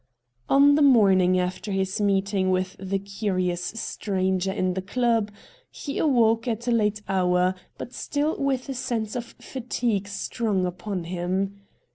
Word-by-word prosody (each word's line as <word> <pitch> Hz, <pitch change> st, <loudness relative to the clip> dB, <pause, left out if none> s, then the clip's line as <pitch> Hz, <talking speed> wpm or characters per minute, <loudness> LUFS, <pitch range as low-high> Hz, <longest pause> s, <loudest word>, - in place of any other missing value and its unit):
On 280 Hz, +1 st, +6 dB
the 300 Hz, -, +3 dB
morning 190 Hz, -9 st, +5 dB
after 180 Hz, +3 st, -3 dB
his 190 Hz, +1 st, -1 dB
meeting 195 Hz, -1 st, +1 dB
with 185 Hz, 0 st, 0 dB
the 195 Hz, +1 st, -1 dB
curious 190 Hz, -3 st, -2 dB
stranger 190 Hz, -2 st, -1 dB
in 185 Hz, -2 st, 0 dB
the 190 Hz, -, -3 dB
club, 230 Hz, +1 st, +1 dB, 0.4 s
he 280 Hz, -, -5 dB
awoke 230 Hz, -5 st, +3 dB
at 235 Hz, +1 st, -2 dB
a -, -, +2 dB
late 210 Hz, -2 st, +1 dB
hour, 180 Hz, -1 st, +2 dB, 0.2 s
but 245 Hz, -, -7 dB
still 295 Hz, +4 st, -1 dB
with 270 Hz, -2 st, 0 dB
a 270 Hz, -, -3 dB
sense 230 Hz, -3 st, -3 dB
of 240 Hz, -1 st, -6 dB
fatigue 235 Hz, -5 st, -2 dB
strong 205 Hz, -1 st, -1 dB
upon 180 Hz, +1 st, -4 dB
him. 185 Hz, +3 st, -2 dB
200 Hz, 145 wpm, -25 LUFS, 185-235 Hz, 0.4 s, On